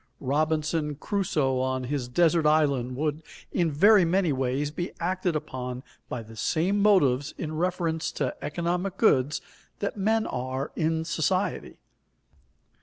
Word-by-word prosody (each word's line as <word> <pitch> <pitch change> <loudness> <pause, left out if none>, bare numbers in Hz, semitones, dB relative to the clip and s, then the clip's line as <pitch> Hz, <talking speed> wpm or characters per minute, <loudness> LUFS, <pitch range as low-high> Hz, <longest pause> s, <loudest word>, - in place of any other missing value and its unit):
Robinson 155 +2 0
Crusoe 155 -7 0
on 130 0 -1
his 130 -1 -2
desert 165 +4 +3
island 140 -5 +2
would 150 +2 -1 0.3
in 170 -2 +1
very 195 +7 +6
many 175 -2 +2
ways 135 +3 -1
be 175 +3 -4
acted 180 -1 -1
upon 130 -4 -4 0.3
by 120 -2 -4
the 110 +1 -13
same 175 - 0
motives 145 -10 +3
in 155 -1 -4
reference 170 -1 -1
to 135 -4 -2
economic 175 +4 -2
goods 145 - +3 0.4
that 205 - -3
men 220 +3 +1
are 130 +2 -3
in 160 0 0
society. 185 +4 -1
155 Hz, 130 wpm, -27 LUFS, 135-175 Hz, 0.4 s, very